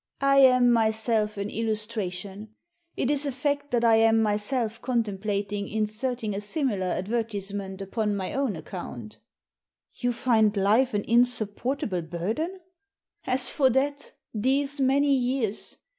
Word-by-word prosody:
I 275 0 +4
am 255 -2 +6
myself 220 -1 +1
an 200 +1 -3
illustration. 215 -2 -3 0.4
It 260 - +1
is 290 0 +1
a - - -1
fact 285 +2 -2
that 240 -1 +1
I 225 -1 +6
am 225 0 +4
myself 220 +2 -1
contemplating 205 -4 -2
inserting 220 +1 -2
a 200 - -3
similar 210 - -1
advertisement 200 -1 -3
upon 210 +1 -1
my 190 -2 -3
own 270 -7 -1
account" 155 - -8 0.4
" - - -56
You 245 -1 +1
find 220 -4 +2
life 215 +6 +3
an 205 - 0
insupportable 235 -3 0
burden? 220 - -4 0.2
" 400 0 -59
" - - -31
As 255 0 +3
for 270 -3 +3
that, 280 +3 -1 0.2
these 275 +6 +1
many 275 +2 +3
years 250 -5 -1
225 Hz, 140 wpm, -26 LUFS, 205-260 Hz, 0.4 s, am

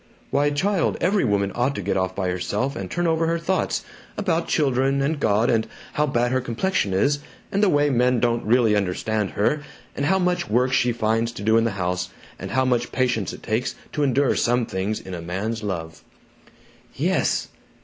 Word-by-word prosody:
"Why, 145 +1 +3
child, 185 +5 0
every 195 +3 +2
woman 100 -3 +1
ought 125 +3 0
to 100 - -4
get 100 - 0
off 95 0 -1
by 95 -2 -1
herself 105 +9 -2
and - - -5
turn 175 0 -1
over 165 0 +2
her 165 0 +1
thoughts 180 +3 -1 0.3
about 170 -5 0
children, 135 -2 +2
and 145 +2 0
God, 110 -1 +2
and 110 -1 +1 0.3
how 150 0 +1
bad 120 -2 +1
her 130 0 +1
complexion 120 - -1
is, 140 +10 +2 0.3
and 200 - +1
the 205 - +4
way 145 -2 +3
men 125 0 +3
don't 120 -1 +1
really 115 -1 +3
understand 105 +1 -1
her, 145 +9 +1 0.3
and 140 - -1
how 190 - +3
much 180 - 0
work 125 +4 +2
she 125 -1 +3
finds 115 0 0
to 100 - -7
do 110 +2 +3
in 115 0 +4
the 115 - 0
house, 90 0 -1 0.3
and - - -6
how 130 +2 +1
much 120 -2 0
patience 120 -6 0
it - - -11
takes 115 +3 -1 0.2
to 150 - -2
endure 140 -1 +2
some 120 0 +2
things 100 +2 -2
in 95 - -9
a 85 - -5
man's 100 +7 -3
love." 85 -6 -5 0.9
"Yes!" - - 0
120 Hz, 200 wpm, -23 LUFS, 105-145 Hz, 0.9 s, the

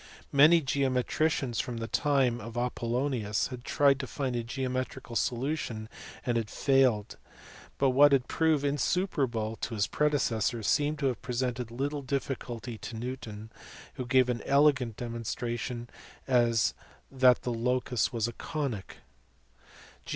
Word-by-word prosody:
Many 155 +4 +7
geometricians 135 -1 0
from 120 -2 -3
the 115 0 -4
time 130 -4 +1
of 115 +2 -8
Apollonius 120 -2 -1
had 125 -2 -8
tried 140 0 +3
to 130 - -4
find 130 -2 -3
a 120 - 0
geometrical 130 -1 -4
solution 120 -3 -2 0.4
and 120 -1 +1
had 110 -2 -2
failed, 130 -6 +2 0.6
but 135 -1 +3
what 145 +3 +6
had 135 -2 +3
proved 160 -3 +1
insuperable 135 - 0
to 115 - -4
his 100 -1 +2
predecessors 120 -7 0
seems 150 +5 +2
to - - 0
have 125 -4 0
presented 125 -1 -2
little 140 +5 -3
difficulty 125 -4 -4
to 115 - -7
Newton 110 -3 -6 0.4
who 125 - -5
gave 130 0 +4
an 120 -2 -1
elegant 135 -5 +3
demonstration 120 0 -4 0.4
that 125 +1 +2
the 120 - -1
locus 125 0 0
was 115 -2 0
a 120 - -5
conic. 135 - -4
125 Hz, 130 wpm, -29 LUFS, 115-140 Hz, 0.6 s, Many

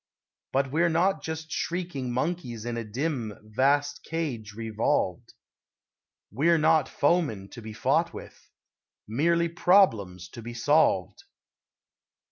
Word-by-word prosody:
But 135 0 0
we're 170 +3 +3
not 170 0 +2
just 160 0 -6
shrieking 170 -8 -3
monkeys 125 -4 -3
In 120 -1 -3
a 115 - -3
dim, 120 -1 -3
vast 140 +7 +1
cage 130 -11 -4
revolved; 110 -4 -1 1.0
We're 160 - +3
not 155 -1 +3
foemen 145 - +1
to 120 - -10
be 110 0 -8
fought - - +1
with, - - -12 0.6
Merely 170 +9 +2
problems 115 - +3
to 115 - -10
be 120 +1 -8
solved. 120 - +2
135 Hz, 115 wpm, -27 LUFS, 110-165 Hz, 1.0 s, we're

